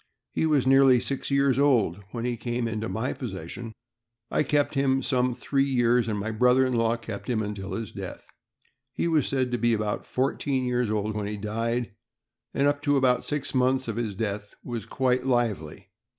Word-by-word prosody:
He 160 - +1
was 145 -4 +2
nearly 135 -1 +6
six 135 +3 -3
years 140 -1 +3
old 115 - +3
when 115 +1 -4
he 125 -1 0
came 120 0 -2
into 110 0 -3
my 115 +4 -2
possession. 110 - -6 0.6
I - - +2
kept 145 -1 +1
him 135 -2 +2
some 125 -1 +1
three 135 +2 0
years, 120 -3 +2
and 105 -2 -1
my 105 +2 -2
brother 125 +4 +4
in 130 - -1
law 115 0 +2
kept 115 0 -7
him 110 -3 +1
until 105 -1 -5
his 115 -4 -4
death. - - -7 0.7
He 170 - -1
was 160 -4 +2
said 130 -2 0
to 120 - -1
be 120 +1 +3
about 105 -1 -3
four 130 +2 0
teen 135 -3 -1
years 125 -2 0
old 105 0 -1
when 105 -1 -2
he 105 0 -4
died, 115 +3 -2 0.6
and 140 +1 +2
up 145 0 +1
to 145 -1 +2
about 125 -2 +2
six 145 -1 -2
months 130 0 +2
of 115 - -3
his 110 -4 -2
death 105 0 -4
was 120 -4 -5
quite 130 -1 +1
lively. 115 - -1
120 Hz, 195 wpm, -26 LUFS, 110-130 Hz, 0.7 s, nearly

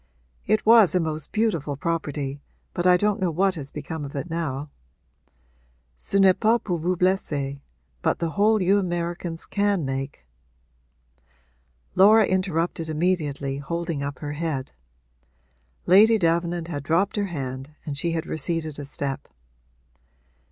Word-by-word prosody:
'It 215 +1 +2
was 220 -5 +6
a - - +4
most 155 -2 -3
beautiful 170 -11 0
property, 145 -3 -3 0.3
but 175 0 0
I 180 0 +6
don't 205 +2 +1
know 185 - +2
what 190 +4 +1
has 145 -5 -6
become 150 +1 -6
of 140 0 -7
it 145 +5 -4
now. 150 -3 -3 1.2
Ce - - -5
n'est 195 -2 +5
pas 225 +1 +4
pour 175 -6 -3
vous 180 +3 0
blesser, 145 -7 0 0.4
but - - +1
the 165 -1 -2
hole 215 +3 +3
you 195 +3 +4
Americans 175 -2 -3
can 200 -5 0
make 135 - -4 0.9
' - - -39
Laura 210 +3 +7
interrupted 175 -3 -1
immediately, 150 -5 -1
holding 170 +1 -3
up 140 0 -4
her 145 -1 -5
head; 150 -4 -3 1.1
Lady 215 +5 +6
Davenant 170 -1 0
had 145 -4 -4
dropped 165 +8 +1
her 205 -1 0
hand 135 -3 -6
and 145 - -4
she 165 +4 -1
had 165 0 -2
receded 160 -2 -2
a 145 - -5
step. 140 -1 -4
165 Hz, 145 wpm, -24 LUFS, 140-185 Hz, 1.2 s, Laura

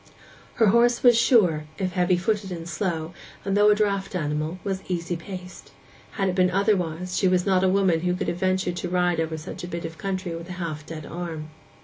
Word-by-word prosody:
Her 230 - +4
horse 235 +3 +3
was 245 -2 +7
sure, 190 - +4
if 185 -2 -1
heavy 180 0 +2
footed 200 +1 -1
and 165 -1 -6
slow, 165 0 -2 0.3
and 195 0 0
though 205 +1 +6
a 210 - +6
draught 200 -2 -1
animal, 155 +1 -2
was 195 -2 -2
easy 175 -1 -2
paced; 180 +1 -9 0.4
had 195 -2 0
it - - -1
been 185 0 +3
otherwise, 185 -3 0
she 190 - +3
was 180 -1 +2
not 190 -1 +3
a 190 - +4
woman 190 -3 +3
who 180 +1 0
could - - -3
have 175 - -1
ventured 185 -1 0
to 180 - -3
ride 180 -1 +1
over 160 0 -1
such 155 - -8
a - - -4
bit 170 -1 -5
of 165 0 -7
country 190 -3 -3
with 170 +2 -8
a - - -4
half 160 -4 -5
dead 155 -2 -7
arm. 160 -2 -6
180 Hz, 220 wpm, -25 LUFS, 165-195 Hz, 0.4 s, was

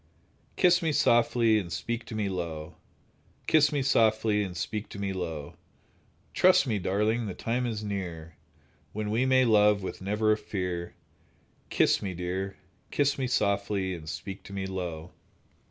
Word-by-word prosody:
Kiss 180 0 +4
me 160 -2 +1
softly, 115 -4 +3
and 85 -4 -6
speak 115 +7 -3
to 110 - -7
me 105 -2 -1
low. 85 -3 -4 0.7
Kiss 150 -2 +4
me 145 -2 0
softly, 110 -4 +3
and 95 -3 -4
speak 105 +6 -4
to - - -9
me 100 -1 -2
low; 80 -6 -5 0.8
Trust 185 -5 +5
me, 110 -6 -1
darling, 105 +5 0
the 95 - -5
time 125 +2 -1
is 110 -2 -4
near, 85 -6 -5 0.6
When 105 0 -3
we 120 +4 +1
may 130 -1 +4
love 105 -3 +4
with 95 - -6
never 105 +3 +1
a 105 - +3
fear. 90 -5 -4 0.7
Kiss - - +3
me, 95 -3 -4
dear! 95 +2 -4 0.3
Kiss 140 -1 +1
me 130 - 0
softly, 100 -4 0
and 80 -3 -8
speak 95 +4 -6
to 100 - -10
me 95 -1 -3
low. 90 -3 -5
105 Hz, 160 wpm, -28 LUFS, 90-115 Hz, 0.8 s, Trust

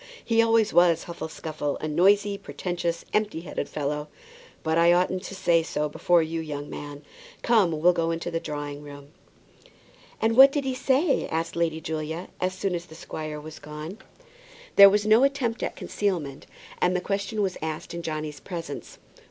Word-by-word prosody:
He 230 -1 +4
always 225 -1 +3
was 175 -2 +4
Huffle 170 -2 -6
Scuffle; 155 -2 -4
a 155 - -4
noisy, 200 +6 +3
pretentious, 175 -3 -4
empty 210 -6 0
headed 165 - -5
fellow. 150 0 -3 0.6
But 160 +1 +1
I 170 +1 +6
oughtn't 185 +1 +2
to 195 - -7
say 170 -3 +3
so 150 -2 -2
before 170 +3 +2
you, 165 +1 -3
young 145 -2 -6
man. 145 0 -8 0.4
Come, 215 -7 +4
we'll 175 +3 +5
go 165 -1 0
into 165 +1 -3
the 165 - -1
drawing 145 -2 -5
room." 145 -1 -11 1.1
"And 225 +1 +2
what 270 +2 +9
did 285 0 -1
he 265 -1 -1
say?" 270 +4 +1
asked 165 +1 -3
Lady 165 -2 0
Julia, 160 +2 -4
as 185 0 -1
soon 190 0 -2
as 175 0 -3
the 160 - -13
squire 155 -1 -6
was 155 +1 -10
gone. 150 +7 -8 0.8
There 200 0 +11
was 205 +1 +1
no 220 +4 +5
attempt 275 -5 0
at - - -3
concealment, 165 -9 -3 0.3
and 180 +1 +2
the - - +2
question 200 +2 -2
was 190 -2 -1
asked 160 +2 -5
in 170 - -4
Johnny's 155 -2 -4
presence. 165 -6 -7
170 Hz, 175 wpm, -26 LUFS, 155-200 Hz, 1.1 s, There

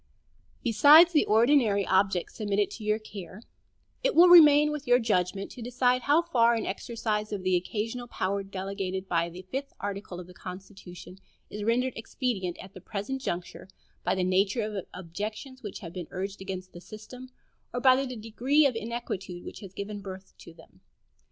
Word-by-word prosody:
Besides 295 +9 +7
the 300 - +4
ordinary 220 -3 +3
objects 190 -2 +1
submitted 205 -2 -1
to 220 - -9
your 210 0 +1
care, 210 -1 -10 0.6
it - - +1
will 350 +2 +8
remain 300 -3 +8
with 300 -1 -6
your 245 0 +6
judgment 195 -4 -1
to 245 - -10
decide 250 +1 +1
how 295 +6 +3
far 235 -8 +3
an 225 - -2
exercise 215 0 -3
of 200 -3 -4
the 185 -1 +2
occasional 225 +7 -3
power 200 -3 -2
delegated 195 -1 -5
by 170 -1 0
the 180 +2 -10
fifth 270 +9 -5
article 200 -2 -5
of 180 - -8
the 180 - -14
Constitution 185 0 -11 0.3
is 210 0 -5
rendered 245 +3 +1
expedient 220 -6 -3
at 190 +1 -12
the 185 - -11
present 215 +10 -5
juncture 175 -6 -5 0.4
by - - +1
the 185 - 0
nature 195 +5 +1
of 210 -3 -5
objections 215 - -7
which 210 -5 -7
have 170 -3 -8
been 180 -3 -6
urged 195 +1 -5
against 185 -1 -6
the 175 - -10
system, 245 +6 -11 0.4
or 245 - -3
by 255 0 +6
the 260 -1 -2
degree 245 +7 +1
of 265 -4 +2
inquietude 220 -6 -5
which - - -8
has 195 -3 -10
given 200 +1 -6
birth 190 -1 -9
to - - -12
them. 160 - -19
210 Hz, 175 wpm, -28 LUFS, 190-245 Hz, 0.6 s, will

